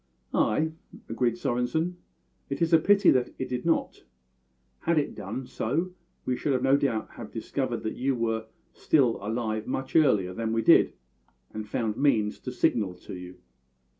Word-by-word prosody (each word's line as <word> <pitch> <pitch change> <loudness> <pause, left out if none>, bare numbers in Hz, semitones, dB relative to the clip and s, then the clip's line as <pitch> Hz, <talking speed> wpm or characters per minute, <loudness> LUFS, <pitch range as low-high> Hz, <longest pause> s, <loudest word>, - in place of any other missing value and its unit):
"Ay," 155 +9 +2 0.4
agreed 115 +1 +1
Svorenssen, 140 +8 -1 0.5
"it 140 - -3
is 165 0 +1
a 165 - +8
pity 200 +3 +5
that 125 -2 +2
it 130 - -3
did 125 +5 -3
not. 165 - 0 0.8
Had 170 -1 +1
it 145 - +1
done 110 +6 -5
so 160 +12 -2 0.3
we 125 - 0
should 135 0 0
no 135 +1 +5
doubt 130 -6 0
have - - -9
discovered - - -3
that 110 - -2
you 135 +1 0
were 115 -1 -1 0.3
still 130 -7 +2
alive 110 0 -2
much 130 +1 -4
earlier 105 - +4
than 115 +2 -2
we 115 0 +1
did, - - +6 0.6
and 105 -1 -6
found 110 -3 -1
means 110 -7 +2
to - - -6
signal 100 -6 +1
to 90 - -11
you." 90 0 -9
125 Hz, 165 wpm, -27 LUFS, 110-145 Hz, 0.8 s, a